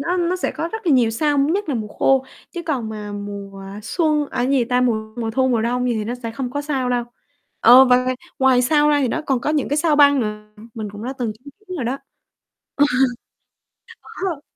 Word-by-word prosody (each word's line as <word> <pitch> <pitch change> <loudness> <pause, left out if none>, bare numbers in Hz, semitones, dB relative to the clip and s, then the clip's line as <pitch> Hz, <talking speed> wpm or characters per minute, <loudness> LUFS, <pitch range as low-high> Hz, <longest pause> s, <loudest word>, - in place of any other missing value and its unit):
nó 345 +6 -1
nó 355 0 0
sẽ 370 - -2
có 330 - -3
rất 445 -3 -6
là 315 - +4
nhiều 240 -4 +4
sao, 290 +5 0
nhất 325 +8 +1
là 285 - 0
mùa 215 -3 -3
khô, 265 +5 +2 0.3
chứ 345 - -6
còn 260 -8 -2
mà 210 -1 -6
mùa 200 -1 -7 0.2
xuân, 305 - 0
à - - -8
cái 260 - 0
gì 265 -4 +3
ta, 250 +1 +1
mùa 220 -3 -1
mùa 230 -2 -2
thu, 260 +3 +1
mùa 235 -3 +1
đông 245 +2 0
gì 240 - +1
thì 215 -1 -2
nó 235 +3 -3
sẽ 230 - -3
không 245 +2 -4
có 285 +3 -3
sao 275 -4 -1
đâu. 245 -1 0 0.6
Ờ, 250 +3 +8
và 250 -1 +5
ngoài 255 0 0 0.2
ngoài 260 -2 +4
sao 295 +3 +3
ra 295 -1 +3
thì 265 - +1
nó 320 +7 -2
còn 265 -3 +1
có 295 - -1
những 300 -2 0
cái 290 - 0
sao 310 -1 +2
băng 285 -2 +6
nữa, 210 -1 -4 0.3
mình 215 -2 -5
cũng 205 +2 -9
đã 260 - -3
từng 235 -4 -2
chứng 250 +7 -15 0.2
kiến 370 - -5
rồi 255 - -3
đó. 260 +4 -2 0.8
Ờ. 290 - +4 1.2
Có - - -16 0.2
rồi. 330 -7 -3
255 Hz, 245 wpm, -20 LUFS, 225-295 Hz, 1.2 s, Ờ